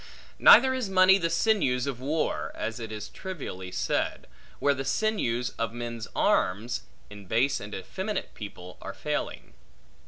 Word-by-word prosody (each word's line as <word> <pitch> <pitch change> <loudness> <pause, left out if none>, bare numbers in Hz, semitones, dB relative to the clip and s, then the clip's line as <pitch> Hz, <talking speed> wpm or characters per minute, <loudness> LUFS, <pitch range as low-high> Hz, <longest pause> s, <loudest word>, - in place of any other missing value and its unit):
Neither 260 0 +8
is 255 -6 -2
money 190 +1 +6
the 165 -2 0
sinews 165 - +2
of 135 -4 -3
war 150 +5 -1
(as 115 +1 -4
it 110 -1 -6
is 105 -1 -5
trivially 130 - -7
said), - - -1 0.3
where 145 - +3
the 135 -1 -4
sinews 135 - 0
of 115 0 -1
men's 120 -2 -5
arms, 105 +6 +1 0.3
in 100 -2 -11
base 125 +7 +2
and 105 +1 -7
effeminate 190 - -4
people, 90 -4 -9
are - - -6
failing. - - -4
125 Hz, 150 wpm, -28 LUFS, 110-185 Hz, 0.3 s, Neither